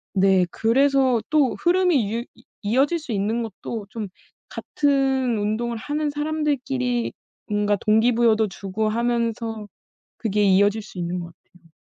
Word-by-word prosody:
네. 190 -1 +4
그래서 260 0 +2
또 295 -5 +2
흐름이 345 - +2
유 235 +1 -3
이 - - -21 0.2
이어질 270 +10 +2
수 300 -5 -8
있는 215 +3 -1
것도 220 0 -6
좀 215 -2 -5 0.4
같은 270 -4 0
운동을 220 +3 -1
하는 295 +6 -2
사람들끼리 280 -5 -1 0.4
뭔가 205 0 +1
동기부여도 220 +1 +3
주고 200 +2 -3
하면서 230 -1 -2 0.5
그게 210 -2 0
이어질 205 +2 +3
수 205 - -13
있는 175 +1 -2
것 175 - -5
같아요. 170 0 -22
230 Hz, 280 characters per minute, -23 LUFS, 205-265 Hz, 0.5 s, 네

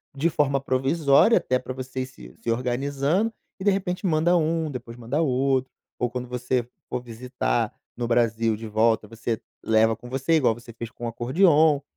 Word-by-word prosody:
de 160 +5 +1
forma 140 -2 +1
provisória, 140 - +3
até 130 0 +1
pra 130 - -6
você 130 0 -5
ir - - -2
se - - -14
se - - -4
organizando 140 - 0 0.3
e - - -6
de 205 - +4
repente 185 0 -2
manda 170 +1 +3
um, 160 -1 0
depois 120 -2 -8
manda 120 +7 -1
outro. 130 -2 +1 0.3
Ou 125 - +1
quando 125 0 -5
você 125 0 -1 0.2
for 125 - -2
visitar 115 - -2 0.2
no 120 -1 -3
Brasil 115 -1 +2
de 110 +1 -7
volta 110 0 +2
você 115 0 -3 0.2
leva 110 0 +3
com 120 +2 -12
você, 135 +5 0
igual 130 -8 +4
você 120 0 -12
fez 115 0 -6
com 120 - -8
o - - -1
acordeão 145 - +3
130 Hz, 185 wpm, -25 LUFS, 115-145 Hz, 0.3 s, de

